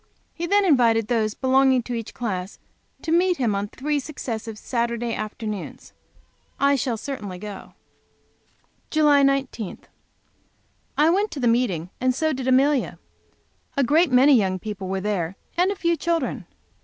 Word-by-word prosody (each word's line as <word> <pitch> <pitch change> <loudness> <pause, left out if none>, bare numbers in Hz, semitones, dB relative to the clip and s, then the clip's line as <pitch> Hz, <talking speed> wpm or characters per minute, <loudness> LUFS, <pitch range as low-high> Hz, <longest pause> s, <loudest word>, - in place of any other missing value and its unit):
He 340 +1 -4
then 405 +2 +3
invited 235 - +4
those 220 -3 0
belonging 260 -1 +3
to 245 - -5
each 230 -2 -5
class 190 -5 -4 0.5
to 320 - -2
meet 355 +1 +3
him 235 -5 +1
on 200 +1 -2
three 290 +7 -2
successive 230 -6 -6
Saturday 235 0 -2
afternoons. 215 -2 -6 0.7
I 280 0 +4
shall 245 -3 -1
certainly 210 -8 -6
go. 205 +1 -9 1.1
July 300 -2 +4
19. 275 -7 0 1.2
I 310 +3 +5
went 405 +4 +1
to 295 - -7
the 245 - +1
meeting, 200 -8 0
and 255 0 +2
so 315 +3 0
did 260 -1 -4
Amelia. 270 +1 +2 0.8
A 280 - +4
great 310 +4 +3
many 260 +3 +6
young 190 -6 +2
people 200 0 -6
were 190 0 -2
there 190 -3 -2 0.2
and 360 +2 +3
a 400 - -1
few 340 -2 +1
children. 335 0 -2
250 Hz, 150 wpm, -23 LUFS, 215-290 Hz, 1.2 s, many